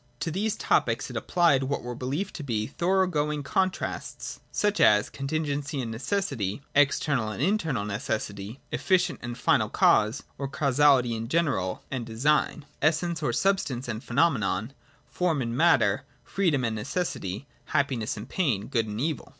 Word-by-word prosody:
To 165 - -1
these 205 +5 -1
topics - - +1
it - - -9
applied 170 -7 +3
what 140 +2 -2
were 120 0 -4
believed 140 +11 -3
to 155 - -6
be 110 -6 -1
thorough 190 +8 +1
going 150 -4 -1
contrasts: 185 +5 -2
such 210 0 0
as 105 0 +5
contingency 145 0 -2
and 115 -3 -3
necessity; 135 - -2
external 140 -4 +2
and 105 - -6
internal 160 - 0
necessity; 105 +2 -4
efficient 185 -2 +1
and 120 0 -5
final - - +2
cause, 110 +5 +3 0.2
or 140 - -2
causality 140 -3 +3
in 115 0 -4
general 130 - 0
and 130 -3 -2
design; 140 +6 +1 0.2
essence 160 +2 +1
or 145 - +1
substance 135 -3 0
and 115 +1 -4
phenomenon; 120 - +1 0.3
form 175 -5 0
and 120 -2 -2
matter; 130 -9 +3 0.2
free 195 -2 +1
dom 140 -5 0
and 115 -2 -1
necessity; 105 - -3 0.2
happiness 125 -6 0
and 105 - -7
pain; 125 - 0
good 115 -4 0
and 105 +1 -5
evil. 150 0 -2
140 Hz, 155 wpm, -27 LUFS, 115-160 Hz, 0.3 s, as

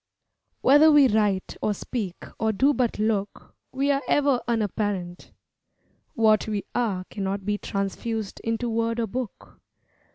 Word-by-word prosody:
Whether 295 +4 +6
we 290 -2 +7
write 210 -4 0
or 210 - 0
speak 200 -5 -5
or 220 0 +1
do 270 +7 +3
but 250 -4 0
look 210 -2 -2 0.2
We 275 +2 +1
are 275 0 +1
ever 280 -4 +2
unapparent. 205 -5 -2 0.8
What 220 -2 +3
we 210 -2 -3
are 200 -7 -1
Cannot 195 -1 -3
be 205 0 -1
transfused 200 +2 -3
into 225 +1 -2
word 230 0 -1
or 230 - +1
book. 235 +1 -7
220 Hz, 135 wpm, -25 LUFS, 200-245 Hz, 0.8 s, we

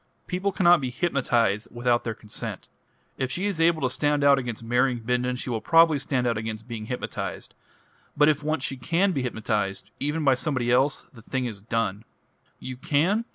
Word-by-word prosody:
"People 185 +2 -1
cannot 175 -3 +5
be 130 - -2
hypnotised 120 - 0
without 120 0 +1
their 115 -2 -3
consent. 105 -1 -6 0.5
If 130 -1 -1
she 185 +8 -2
is 195 -5 -1
able 165 -2 +3
to 130 - +2
stand 145 +1 +1
out 140 -1 +6
against 120 -3 -5
marrying 125 +1 +1
Bindon, 125 +2 0
she 125 0 -4
will 110 -2 -2
probably 165 -3 +5
stand 130 -2 -1
out 115 -3 0
against 110 +1 -6
being 110 -3 -6
hypnotised. 125 - -5 0.6
But 150 0 +5
if 150 -1 +2
once 155 -2 -1
she 135 - -3
can 170 +9 +1
be 140 - -1
hypnotised 105 -4 -2
even 150 +3 -1
by 135 -2 +5
somebody 130 -3 -1
else 130 +3 +2
the 115 - -13
thing 130 +3 -3
is 110 -5 -6
done." 110 -2 -2 0.5
"You 130 -1 -7
can 170 - +1
130 Hz, 190 wpm, -25 LUFS, 115-150 Hz, 0.6 s, out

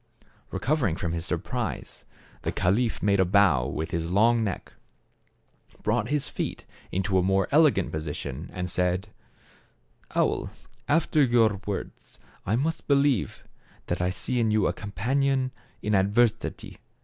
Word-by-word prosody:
Recovering 130 - 0
from 85 -1 -3
his 85 -1 -3
sur - - 0
prise, - - -5 0.4
the - - -2
caliph 110 +6 0
made 100 -1 +3
a - - +6
bow 90 -9 +4
with 80 +2 -4
his 85 0 -2
long 115 +5 +4
neck, 100 -3 -4 1.1
brought 110 +2 0
his 145 -2 0
feet - - -4 0.3
into 95 0 +1
a - - +3
more 95 0 +2
ele 155 +2 +7
gant 95 -9 -2
position, 75 -1 -5
and 90 -1 -3
said: 90 +2 0 1.1
"Owl, - - +1 0.4
after 155 0 +3
your 115 -6 +3
words, 100 - -6 0.3
I 105 - +2
must 160 +6 -1
believe 140 -5 +2 0.4
that - - -2
I 90 - +1
see 120 +7 -2
in 115 -2 +2
you 105 -2 +2
a - - +1
companion 130 +5 0 0.3
in 105 - 0
adversity. 105 +3 +1
105 Hz, 145 wpm, -26 LUFS, 90-125 Hz, 1.1 s, ele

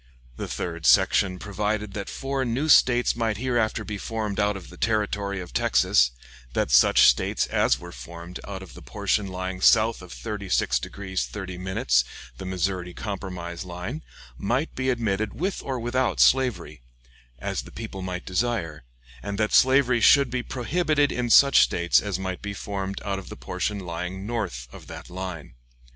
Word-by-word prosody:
The - - -5
third 85 -2 -3
section 95 -2 +4
provided 105 +1 -3
that 100 -1 -5
four 135 0 -2
new 130 +6 -1
States 125 -4 +5
might 115 -3 -1
hereafter 120 -2 0
be 105 -1 -5
formed 110 -1 -3
out 105 -1 +1
of 90 - -12
the - - -11
Territory 105 -2 -1
of 90 -1 -8
Texas; - - +3 0.4
that - - 0
such - - +6
States - - +2
as - - +2
were 85 0 -10
formed 85 +1 -9
out 95 -1 -6
of 95 - -13
the - - -12
portion 105 -2 -1
lying 95 0 -5
south 115 0 +4
of 90 -1 -12
36 100 - -1
degrees 95 +6 -4
30', 95 -3 -7 0.8
the 95 - -6
Missouri 90 -1 -2
Compromise 90 -4 -5
line, 90 - -6 0.4
might 125 - -1
be 130 0 -1
admitted 110 -4 -1
with 185 - -2
or 130 -2 -3
without 125 +2 0
slavery, 100 - +2 0.6
as - - -3
the - - -13
people 110 -4 -7
might 90 -1 -5
desire; 95 - -2 0.4
and 100 +6 -4
that 110 0 0
slavery 130 -2 +5
should 140 +1 +6
be 125 -1 -1
prohibited 145 +4 0
in 125 -1 -2
such 140 +3 +7
States 85 0 +3
as 100 -3 -2
might 95 -1 -4
be 100 -1 -5
formed 100 -1 -4
out 100 -1 -2
of 95 - -11
the - - -9
portion 105 - -3
lying 90 +1 -5
north 100 - -3
of - - -12
that - - -10
line. 90 -6 -6
100 Hz, 165 wpm, -25 LUFS, 90-120 Hz, 0.8 s, such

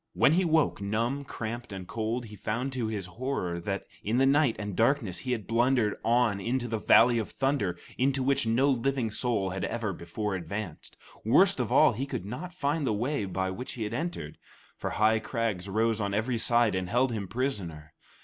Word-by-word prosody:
When 145 - +4
he 185 +3 +3
woke, 160 -9 +2
numb, 115 +7 -1
cramped, 120 -1 -5
and 95 -2 -7
cold, 115 +2 -2
he 105 -1 -10
found 120 +6 -3
to 125 -4 -1
his 105 -4 -3
horror 90 -4 -3
that 100 +3 -3 0.2
in 110 +4 0
the 135 - +4
night 140 -3 +4
and 100 -2 -5
darkness 115 -5 +1
he 130 - -4
had 110 -5 -2
blundered 120 -2 +2
on 115 -3 +2
into 120 +4 -1
the 110 -1 -2
Valley 120 +2 +5
of 110 - -3
Thunder, 135 -11 0 0.2
into 135 +1 +2
which 140 -2 +1
no 130 +5 +3
living 130 -2 0
soul 105 -5 0
had 95 -1 -4
ever 115 -4 -2
before 105 +5 -4
advanced. 95 -1 -6 0.3
Worst - - +4
of - - -1
all, - - +6
he 135 +6 -3
could 95 - -4
not 150 - -6
find 150 -4 -1
the - - +2
way 120 +2 -1
by 95 0 -2
which 125 +7 -6
he 115 - -4
had 105 +1 -4
entered, 140 - -4 0.4
for - - -4
high 110 +1 +3
crags 110 -5 -2
rose 110 +2 +1
on 100 -1 -1
every 115 +2 0
side 120 -1 +3
and 95 -1 -2
held 125 +3 +2
him 105 -4 -3
prisoner. 90 - -3
115 Hz, 200 wpm, -28 LUFS, 100-130 Hz, 0.4 s, all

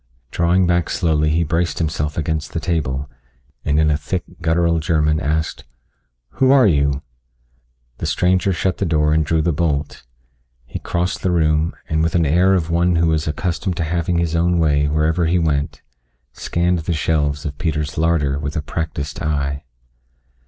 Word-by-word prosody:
Drawing 90 +2 +2
back 85 -1 +1
slowly 75 -2 +1
he 80 +2 +2
braced 80 -1 -1
himself 75 -2 -2
against 80 -1 -2
the - - -1
table, 75 -6 -2 0.6
and 75 +1 +1
in 80 -1 +3
a 75 - +2
thick, 80 +5 -3 0.2
guttural 85 0 +2
German 75 -2 +1
asked, 80 +2 -2 0.7
"Who 130 - +1
are 135 -2 +6
you?" 70 -6 +2 1.0
The - - -3
stranger 95 +2 +2
shut 95 +1 -1
the 100 - 0
door 75 -1 +2
and 80 0 +3
drew 80 +1 0
the 85 - +1
bolt. 75 -2 -1 0.6
He 60 - -6
crossed 90 +2 -2
the 95 - 0
room 80 -1 +1
and, 80 0 0
with 80 +1 0
an 85 -2 +3
air 90 +6 +3
of 85 -3 -1
one 85 +1 +2
who 85 0 +2
was 80 -1 0
accustomed 85 +3 -2
to 85 - 0
having 85 +1 -1
his 85 -1 0
own 85 +1 +2
way 75 -3 +2
wherever 80 +3 +1
he 90 +2 +2
went, 75 -3 -1 0.5
scanned 90 +1 0
the 80 +2 -2
shelves 75 -1 0
of 75 0 -5
Peter's 75 -3 -2
larder 75 -4 +1
with 75 0 -4
a 75 - -2
practiced 75 -2 -4
eye. 70 -2 -2
80 Hz, 175 wpm, -19 LUFS, 75-85 Hz, 1.0 s, are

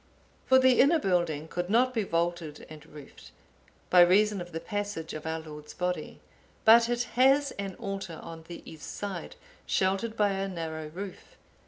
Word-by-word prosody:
For 260 - +6
the 260 -1 +4
inner 295 +6 +6
building 175 - 0
could 175 +2 -4
not 250 +4 +3
be 225 - 0
vaulted 170 -4 -2
and 155 -1 -11
roofed, 145 -2 -13 0.6
by 180 - +8
reason 200 +3 +4
of 175 0 -8
the 165 - -4
passage 205 -4 -4
of 155 +1 -6
our 160 0 -2
Lord's 150 -1 -10
Body; 180 0 -3 0.5
but 230 +1 +7
it 240 0 0
has 270 +3 +4
an 195 -2 -4
altar 195 -4 -6
on 165 -1 -9
the 170 - -9
east 160 -2 -9
side, 195 -5 -6 0.3
sheltered 195 +4 0
by 210 -1 +3
a 195 0 -2
narrow 160 -4 -5
roof. 185 +5 -9
185 Hz, 170 wpm, -28 LUFS, 160-215 Hz, 0.6 s, by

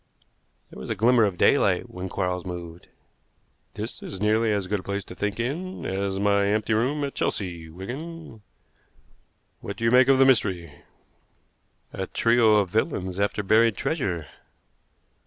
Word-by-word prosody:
There - - -11
was - - -8
a - - -1
glimmer 115 +2 +4
of 95 -3 -2
daylight - - +3
when 90 +1 -7
Quarles 90 -2 -2
moved. 85 -2 -8 0.9
"This - - -6
is 95 - -7
nearly 110 +2 +2
as 100 -2 0
good 105 +2 -1
a - - -8
place 100 +1 -4
to - - -10
think 105 +3 -3
in 170 +10 -4
as 95 0 -2
my 100 0 +2
empty 110 +2 0
room 130 +7 0
at 140 - -3
Chelsea, 85 -5 -3
Wigan. 125 - -8 1.2
What 100 - -7
do - - -6
you 115 - +3
make 125 0 +6
of 135 -1 +5
the 135 - +6
mystery?" 95 - +1 1.2
"A - - -4
trio 115 -2 +3
of 100 -4 +2
villains 95 -3 -1
after 100 +1 0
buried 110 +2 +3
treasure." 95 - -2
105 Hz, 155 wpm, -25 LUFS, 95-115 Hz, 1.2 s, make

